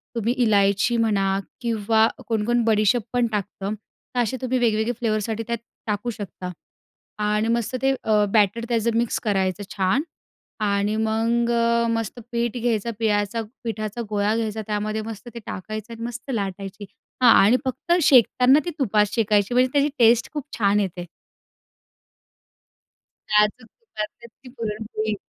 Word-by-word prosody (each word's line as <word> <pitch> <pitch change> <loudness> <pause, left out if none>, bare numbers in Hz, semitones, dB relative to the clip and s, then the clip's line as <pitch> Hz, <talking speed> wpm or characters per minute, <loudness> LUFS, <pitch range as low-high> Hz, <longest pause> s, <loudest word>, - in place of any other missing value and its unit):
तुम्ही 230 +2 0
इलायची 205 +2 +3
म्हणा 210 -4 +2 0.4
किंवा 225 -1 +2 0.2
कोण-कोण 230 +1 +1
बडीशेप 215 +1 +3
पण 245 -1 +2
टाकतं. 205 0 -3 0.4
तर - - +1
असे 240 +2 0
तुम्ही 255 0 0
वेगवेगळे 220 0 +1
फ्लेवरसाठी 220 0 -1
त्यात 235 0 -1 0.3
टाकू 210 +3 -1
शकता 200 -4 -6 0.7
आणि 210 +1 +1
मस्त 235 +1 0
ते 270 0 +3
अ, 210 -1 +3
बॅटर 215 +2 +3
त्याचं 230 0 +1
मिक्स 235 -1 0
करायचं 195 -2 0
छान 195 +10 +2 0.7
आणि 200 +1 +1
मग 225 +2 +1
अ, 235 0 +2
मस्त 225 +1 -2
पीठ 235 0 -1
घ्यायचं, 235 -1 0
पिळायचा 210 0 0 0.2
पिठाचा 215 0 -4
गोळा 210 +1 +1
घ्यायचा. 220 -1 -2
त्यामध्ये 215 +1 -2
मस्त 220 +2 -11
ते 235 - -7
टाकायचं 215 +4 -6
आणि 230 - -8
मस्त 250 +3 -6
लाटायची. 200 -1 -4 0.4
हां. 235 - +8
आणि 240 +5 +5
फक्त 260 +6 -3
शेकताना 255 +1 +5
ती - - -1
तुप 220 -5 0
शेकायची 210 0 +1
म्हणजे 255 +1 +4
त्याची 285 +1 +3
टेस्ट 235 +1 +4
खूप 295 -3 -3
छान 205 -1 +3
येते. 180 -3 -3 2.2
साजूक 210 +2 +2
तुपातली 235 - -8
ती 250 +2 -17
पुरणपोळी 215 -1 -3
220 Hz, 140 wpm, -23 LUFS, 210-235 Hz, 2.2 s, हां